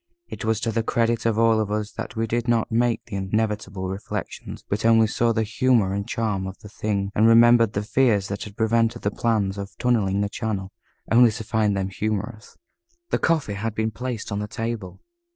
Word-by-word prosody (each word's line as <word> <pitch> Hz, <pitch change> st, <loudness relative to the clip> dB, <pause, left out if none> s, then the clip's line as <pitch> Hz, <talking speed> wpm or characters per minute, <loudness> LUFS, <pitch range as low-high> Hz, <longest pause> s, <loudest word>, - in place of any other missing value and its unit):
It -, -, -7 dB
was 110 Hz, -1 st, +1 dB
to 115 Hz, -, 0 dB
the 115 Hz, +1 st, 0 dB
credit 115 Hz, 0 st, 0 dB
of 110 Hz, -2 st, +1 dB
all 115 Hz, -1 st, +4 dB
of 110 Hz, -2 st, -1 dB
us 105 Hz, 0 st, -2 dB
that -, -, -7 dB
we 115 Hz, 0 st, 0 dB
did 120 Hz, +2 st, -2 dB
not 115 Hz, -1 st, +1 dB
make 115 Hz, 0 st, +1 dB
the 100 Hz, -, -5 dB
inevitable 100 Hz, -1 st, -2 dB
reflections, 95 Hz, +2 st, -6 dB
but 100 Hz, +2 st, -2 dB
only 115 Hz, 0 st, +5 dB
saw 115 Hz, +2 st, +1 dB
the 110 Hz, -1 st, +1 dB
humor 110 Hz, -3 st, +2 dB
and 100 Hz, 0 st, -3 dB
charm 105 Hz, -4 st, -1 dB
of 95 Hz, 0 st, -8 dB
the 105 Hz, -, -13 dB
thing, 100 Hz, -1 st, -2 dB
and 110 Hz, +2 st, +4 dB
remembered 115 Hz, -1 st, +6 dB
the 100 Hz, -, -1 dB
fears 110 Hz, -3 st, +2 dB
that 100 Hz, -, -4 dB
had 105 Hz, -1 st, -11 dB
prevented 115 Hz, 0 st, +1 dB
the 100 Hz, -, +1 dB
plans 100 Hz, -4 st, 0 dB
of 100 Hz, 0 st, -8 dB
tunnelling 105 Hz, -6 st, +1 dB
the 100 Hz, -, +1 dB
channel, 100 Hz, -3 st, -4 dB, 0.4 s
only 120 Hz, +1 st, +7 dB
to 110 Hz, +1 st, -5 dB
find 105 Hz, -2 st, +1 dB
them 95 Hz, 0 st, -1 dB
humorous. 110 Hz, +2 st, -4 dB, 0.5 s
The -, -, +1 dB
coffee 160 Hz, -10 st, +1 dB
had 105 Hz, +2 st, -3 dB
been 110 Hz, 0 st, 0 dB
placed 120 Hz, -1 st, -5 dB
on 100 Hz, -, -2 dB
the 105 Hz, -, -3 dB
table. 115 Hz, -4 st, -5 dB
110 Hz, 205 wpm, -24 LUFS, 100-115 Hz, 0.5 s, only